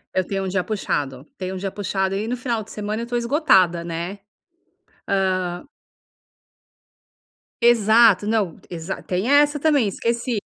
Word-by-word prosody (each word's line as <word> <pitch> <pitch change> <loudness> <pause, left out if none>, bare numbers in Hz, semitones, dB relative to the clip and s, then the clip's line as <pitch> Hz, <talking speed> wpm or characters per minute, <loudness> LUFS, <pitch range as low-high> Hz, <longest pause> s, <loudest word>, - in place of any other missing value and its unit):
Eu 185 - +2
tenho 195 0 -3
um - - -3
dia 185 -1 0
puxado, 140 - -3
tenho 185 0 -4
um - - -4
dia 195 +1 -3
puxado 190 -1 -2
e 205 - -2
no 245 +2 -2
final 235 -3 -2
de - - -14
semana 210 +2 -4
eu - - -3
estou 240 0 -2
esgotada, 215 - +3
né. 170 +4 -5 1.3
Hã 175 0 -7 2.0
Exato, 220 -3 +5
não 215 -6 0
exa 175 +2 -5
tem 190 +7 -2
essa 295 0 +4
também, 285 -7 +3
esqueci. 235 +3 -1
205 Hz, 150 wpm, -22 LUFS, 185-235 Hz, 2.0 s, Exato